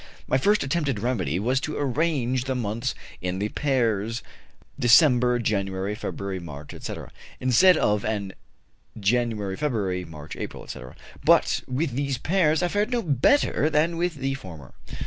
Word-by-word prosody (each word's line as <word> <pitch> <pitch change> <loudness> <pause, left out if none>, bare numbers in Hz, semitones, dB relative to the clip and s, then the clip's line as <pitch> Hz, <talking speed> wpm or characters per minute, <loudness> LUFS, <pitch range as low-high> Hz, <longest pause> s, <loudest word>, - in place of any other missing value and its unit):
My 130 - +2
first 205 +9 +3
attempted 140 -4 -1
remedy 95 - -1
was 125 +5 +1
to 155 - -3
arrange 135 -3 0
the 130 -1 -1
months 115 -1 -2 0.3
in 90 +1 -2
the 105 +2 -1
pairs 115 -5 0 0.6
December 125 -1 +5
January, 100 -3 -1
February 100 -2 -4
March, 75 -4 -9
etc., - - -7 0.3
instead 130 +8 +5
of 105 0 +1
in 100 -3 -2 0.7
January 105 -2 0
February, 100 -9 -1
March 80 -2 -9
April, - - -6
etc.; 65 0 -9 0.3
but - - +4
with 135 +4 -1
these 135 +1 -1
pairs 160 +2 +2
I - - +3
fared 205 +5 0
no 240 -2 0
better 155 - +3
than 160 +2 +2
with 175 0 -1
the 135 -1 -2
former. 85 - -9
125 Hz, 145 wpm, -25 LUFS, 100-145 Hz, 0.7 s, December